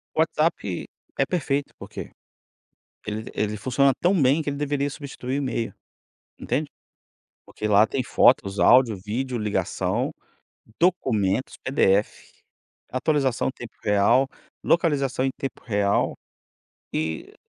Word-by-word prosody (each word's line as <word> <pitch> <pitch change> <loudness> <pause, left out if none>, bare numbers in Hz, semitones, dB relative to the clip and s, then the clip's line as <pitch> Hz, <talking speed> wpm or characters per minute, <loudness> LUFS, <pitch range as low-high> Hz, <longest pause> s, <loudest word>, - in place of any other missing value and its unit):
O - - -2
WhatsApp 155 - 0 0.3
é - - +3
perfeito, 145 -5 -1
porque - - -8 0.9
ele 110 +1 -5
ele 105 0 -1
funciona 135 +4 +2
tão 180 +1 +3
bem 135 +4 +4
que 150 - -3
ele 140 - -4
deveria 145 -1 -1
substituir 135 -3 -5
o - - -2
e-mail, 120 -4 -2 0.7
entende? - - -2 0.8
Porque 110 - -4
lá 105 +1 +5
tem 130 +2 -2
fotos, 100 -4 +3
áudio, 125 -3 +6
vídeo, 125 +4 -2
ligação, 105 -1 -1 0.7
documentos, 130 - +1
PDF, 105 -6 +1 0.6
atualização 135 -1 +1
em - - 0
tempo 120 -2 -9
real, 105 +6 +3 0.4
localização 145 -6 +1
em - - +2
tempo 135 - -5
real, 100 -3 +1 0.8
e 80 +1 -3
130 Hz, 120 wpm, -24 LUFS, 105-140 Hz, 0.9 s, áudio